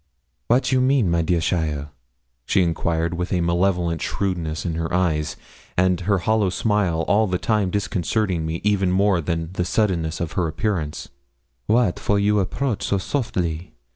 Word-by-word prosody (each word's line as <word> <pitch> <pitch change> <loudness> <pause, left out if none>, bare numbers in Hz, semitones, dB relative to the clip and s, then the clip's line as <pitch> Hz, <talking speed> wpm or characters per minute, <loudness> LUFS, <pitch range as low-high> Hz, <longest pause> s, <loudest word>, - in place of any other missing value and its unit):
'Wat 125 +4 +3
you 130 -1 +3
mean, 130 -8 +3
my 85 0 +2
dear 85 +1 +1
cheaile?' 75 -3 -1 0.6
she 95 - +3
inquired 85 0 0
with 90 +1 -3
a 90 - +1
malevolent 85 -1 +1
shrewdness 85 -5 -2
in 85 - -1
her 80 0 -3
eyes, 80 -4 0 0.4
and 90 0 +3
her 100 +2 +2
hollow 105 +1 +1
smile 95 -4 0
all 110 +2 +3
the 90 -1 0
time 105 -1 +1
disconcerting 95 -1 -1
me 80 +1 -3 0.3
more 95 +1 +3
even 80 - -6
than 80 +1 -2
the 90 - -1
suddenness 90 -5 0
of 85 -2 -3
her 90 -2 0
appearance; 80 -3 -2 0.6
'wat 110 -5 +2
for 100 - +1
you 105 +1 +2
approach 110 +3 -1
so 100 - +1
softly? 90 - -2
90 Hz, 165 wpm, -22 LUFS, 85-100 Hz, 0.6 s, Wat